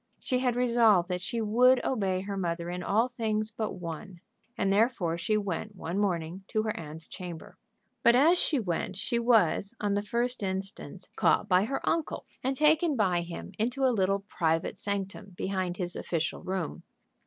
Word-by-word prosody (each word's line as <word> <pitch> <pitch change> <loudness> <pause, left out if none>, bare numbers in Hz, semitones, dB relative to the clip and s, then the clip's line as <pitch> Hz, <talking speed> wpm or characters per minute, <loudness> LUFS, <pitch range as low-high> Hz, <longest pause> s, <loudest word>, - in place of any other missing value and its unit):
She 255 -2 0
had 250 -2 +1
resolved 230 -7 +4
that 180 -1 -2
she 230 +5 -2
would 245 +4 +4
obey 195 -7 0
her 200 +1 -4
mother 170 -2 -2
in 180 0 -4
all 220 +6 +2
things 220 -3 -1
but 220 0 -3
one, 175 +1 -7 0.4
and 195 -2 +2
therefore 205 -6 +2
she 215 +5 0
went 205 +1 -3
one 180 +1 -3
morning 180 -2 -1
to 215 - 0
her 215 -1 -2
aunt's 160 0 -7
chamber. 175 -4 -8 0.4
But 235 +1 +6
as 325 +7 +5
she 295 - +1
went 185 -2 -2
she 235 +4 0
was, 230 -2 +3
on 205 -1 0
the 205 - +1
first 235 +4 -1
instance, 195 0 -5
caught - - +3
by 185 +1 +4
her 270 +4 -3
uncle, 330 -2 -1 0.2
and 265 +1 0
taken 305 +1 +4
by 185 -7 +2
him 170 0 -7
into 250 +5 +1
a 255 - +3
little 195 -1 +1
private 165 -5 -1
sanctum 200 -1 -4
behind 185 -2 -2
his 175 -1 -3
official 165 -2 -2
room. 185 -3 -3
200 Hz, 175 wpm, -29 LUFS, 180-235 Hz, 0.4 s, But